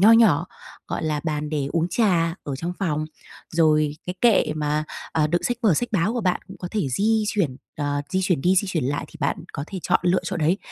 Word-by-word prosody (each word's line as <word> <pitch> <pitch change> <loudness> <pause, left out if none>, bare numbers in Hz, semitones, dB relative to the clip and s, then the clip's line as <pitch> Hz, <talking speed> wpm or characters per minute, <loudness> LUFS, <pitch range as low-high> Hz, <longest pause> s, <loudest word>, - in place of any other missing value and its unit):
nho 215 +4 +8
nhỏ, 185 -8 +5 0.4
gọi - - -3
là, 150 -2 0
bàn 150 -1 -2
để 145 -3 -1
uống 165 0 +1
trà 175 -7 +2
ở 140 -2 -3
trong 170 +5 -3
phòng. 155 -6 0 0.5
Rồi 155 -2 +3
cái 180 - -3
kệ 230 -9 +4
mà, 150 0 0 0.3
ờ, 155 -2 +2
đựng 175 +3 0
sách 245 - 0
vở, 200 -8 +5
sách 245 - 0
báo 200 +2 +2
của 240 - -1
bạn 185 -3 +1
cũng 190 - -10
có 180 - -5
thể 205 -10 -1
di 215 - +2
chuyển, 170 -12 0 0.2
ờ, 145 -1 -1
di 190 - +1
chuyển 180 -7 +1
đi 180 +6 +3
di 200 - +3
chuyển 165 -8 -1
lại 145 +2 -1
thì - - -13
bạn - - +1 0.2
có 140 - -4
thể 190 - -6
chọn - - +2
lựa 180 +1 +3
chỗ - - -2
đấy 165 +5 +2
170 Hz, 240 wpm, -24 LUFS, 150-195 Hz, 0.5 s, nho